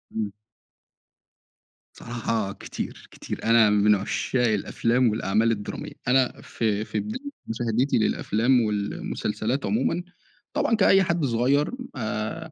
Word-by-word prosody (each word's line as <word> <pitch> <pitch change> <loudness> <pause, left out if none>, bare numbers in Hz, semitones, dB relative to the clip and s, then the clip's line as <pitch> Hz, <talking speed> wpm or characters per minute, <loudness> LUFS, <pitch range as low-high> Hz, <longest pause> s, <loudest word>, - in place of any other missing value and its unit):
إمم. 105 -2 -2 1.6
بصراحة 115 -3 -2
كتير، - - -7
كتير. - - -7
أنا 115 -1 +5
من 105 0 +4
عشّاق 120 +5 0
الأفلام، 115 +3 +1
والأعمال 110 +2 +1
الدرامية. 105 -2 -4 0.2
أنا 130 0 +2
في 110 -2 -1
في - - -2
بداية 255 +7 -5 0.2
مشاهدتي 115 +3 0
للأفلام، 115 +3 +2
والمسلسلات 110 +3 -2
عمومًا، 175 -5 0 0.5
طبعًا 230 - +2
كأي 195 -2 +5
حد 170 -3 0
صغير، 130 +4 +2 0.2
آآ، 110 +7 -4
115 Hz, 110 wpm, -25 LUFS, 110-135 Hz, 1.6 s, أنا